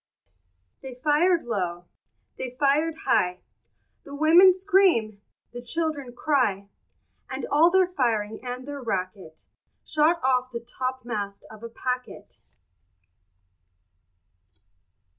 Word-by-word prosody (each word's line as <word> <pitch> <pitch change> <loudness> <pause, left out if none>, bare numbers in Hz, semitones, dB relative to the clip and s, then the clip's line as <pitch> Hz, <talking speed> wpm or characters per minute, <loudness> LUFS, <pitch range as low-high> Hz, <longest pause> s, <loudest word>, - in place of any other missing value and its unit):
They 260 -2 -9
fired 310 +6 +2
low, 180 -6 -3 0.5
they 250 -1 -6
fired 300 +3 +2
high, 180 -8 +1 0.6
The 280 - -10
women 330 +6 +7
scream, 365 - +2 0.3
the 245 0 -8
children 285 -2 -3
cry; 230 -10 0 0.6
And - - -4
all 320 +4 +5
their 375 +1 +4
firing 230 -10 -2
and 250 0 -6
their 285 -1 -7
racket 185 -6 -5 0.4
Shot 310 +2 +2
off 255 -1 +1
the 235 - -4
topmast 235 -4 -5
of 220 -1 -13
a 230 - -7
packet. 250 +2 -6
255 Hz, 105 wpm, -25 LUFS, 220-310 Hz, 0.6 s, women